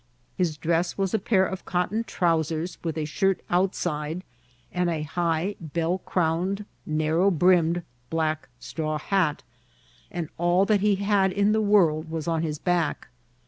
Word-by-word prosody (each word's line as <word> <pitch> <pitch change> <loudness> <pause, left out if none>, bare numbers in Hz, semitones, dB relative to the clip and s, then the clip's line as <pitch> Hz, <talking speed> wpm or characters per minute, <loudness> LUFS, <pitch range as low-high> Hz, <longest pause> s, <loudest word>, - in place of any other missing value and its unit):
His 170 -5 0
dress 170 +3 0
was 195 -2 0
a 220 - +2
pair 190 -1 +3
of 190 0 -5
cotton 190 +5 -1
trousers, 165 -3 0
with 165 -2 -2
a 155 - -1
shirt 195 +5 +1
outside, 175 -3 0 0.5
and 180 -1 0
a 160 -3 -1
high, 170 +4 -1
bell 165 +3 -1
crowned, 180 +4 -1 0.2
narrow 155 +5 +2
brimmed 175 -1 +3 0.3
black 155 -2 -1
straw 155 +1 -3
hat; 165 -2 0 0.7
and 175 -3 -4
all 175 +3 +3
that 210 0 +3
he 205 -1 +3
had 200 -1 +2
in 200 +2 +2
the 220 0 +2
world 170 -7 +3
was 160 -1 -4
on 165 -1 +1
his 155 -2 -2
back. 170 -4 -1
175 Hz, 150 wpm, -26 LUFS, 160-190 Hz, 0.7 s, pair